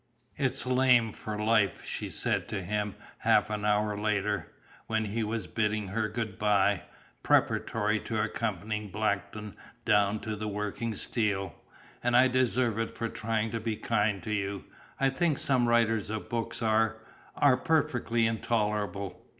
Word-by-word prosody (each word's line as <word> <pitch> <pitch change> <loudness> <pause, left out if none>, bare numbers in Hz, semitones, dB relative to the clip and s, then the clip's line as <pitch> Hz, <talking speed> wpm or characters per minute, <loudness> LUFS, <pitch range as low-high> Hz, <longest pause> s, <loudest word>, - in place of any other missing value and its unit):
"It's 130 -3 -1
lame 125 -3 +4
for 105 -1 -5
life," 105 -3 +2
she - - -4
said - - -1
to 100 -3 -3
him 105 +2 -2 0.2
half 110 - +3
an 105 -1 -2
hour 105 0 +2
later, 105 -1 -1 0.4
when 110 -1 0
he 110 +2 -2
was 110 -2 -2
bidding 105 -2 -1
her 110 +2 -1
good 110 -3 -4
bye, 100 -3 +3 0.4
preparatory 105 - +2
to 110 0 -3
accompanying 105 -1 -3
Blackton 105 0 -2 0.3
down 105 +1 +3
to 110 -1 -3
the 105 +1 -4
working 105 +2 -3
steel. 100 -3 -1 0.5
"And 120 0 +4
I 130 +1 +6
deserve 125 -3 +1
it 115 - -3
for 115 - -2
trying 110 0 -1
to 115 - -2
be 110 0 -2
kind 105 -3 0
to 110 - -4
you. 100 -3 -2 0.4
I 135 0 +3
think 155 +1 +1
some 125 -3 +2
writers 115 -3 +2
of 110 0 -4
books 115 0 -2
are 110 0 +2 0.4
are 140 -3 +5
perfectly 125 -6 +1
intolerable!" 105 -4 -1
110 Hz, 150 wpm, -29 LUFS, 105-115 Hz, 0.5 s, I